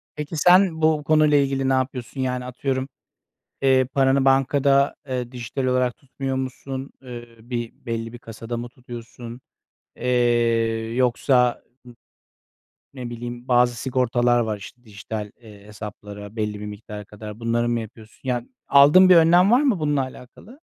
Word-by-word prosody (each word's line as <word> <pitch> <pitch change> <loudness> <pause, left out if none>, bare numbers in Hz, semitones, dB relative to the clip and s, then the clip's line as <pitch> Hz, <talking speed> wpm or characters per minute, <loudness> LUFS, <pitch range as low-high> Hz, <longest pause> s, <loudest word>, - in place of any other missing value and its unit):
Peki, 150 +2 -5
sen 180 0 +4
bu 155 -1 +2
konuyla 155 -1 +4
ilgili 135 -1 +1
ne - - +3
yapıyorsun? 130 0 -2
Yani 125 -1 -2
atıyorum, 130 +1 -3 0.7
eee, 130 -1 +4
paranı 135 +1 +2
bankada, 135 +1 +3
eee, 125 -1 -3
dijital 125 +2 -4
olarak 125 -1 +1
tutmuyor 135 0 -5
musun? 130 +1 -5
Eee, 120 -2 -8
bir 120 0 -5
belli 115 0 -4
bir 120 - -9
kasada 115 +1 -7
mı 120 +1 -5
tutuyorsun? 120 0 -10 0.6
Eee, 115 -2 +1
yoksa 125 0 +2 1.3
n 130 - -9
ne 120 - -5
bileyim 120 +1 -7
bazı 120 -1 +3
sigortalar 120 -1 +1
var 110 -2 -1
işte 120 +4 -13
dijital, 105 0 -7
eee, 105 -3 -14
hesaplara 105 0 -9
belli 105 -1 -3
bir 105 - -6
miktara 105 0 -8
kadar. 105 +1 -10
Bunları 120 +1 0
mı 120 -1 0
yapıyorsun? 110 0 -11
Yani 125 -2 -2 0.2
aldığın 150 +7 +7
bir 180 - +8
önlem 175 +5 +5
var 250 +4 +5
mı 250 - +1
bununla 145 -2 +1
alakalı? 130 - -10
125 Hz, 150 wpm, -23 LUFS, 115-135 Hz, 1.3 s, bir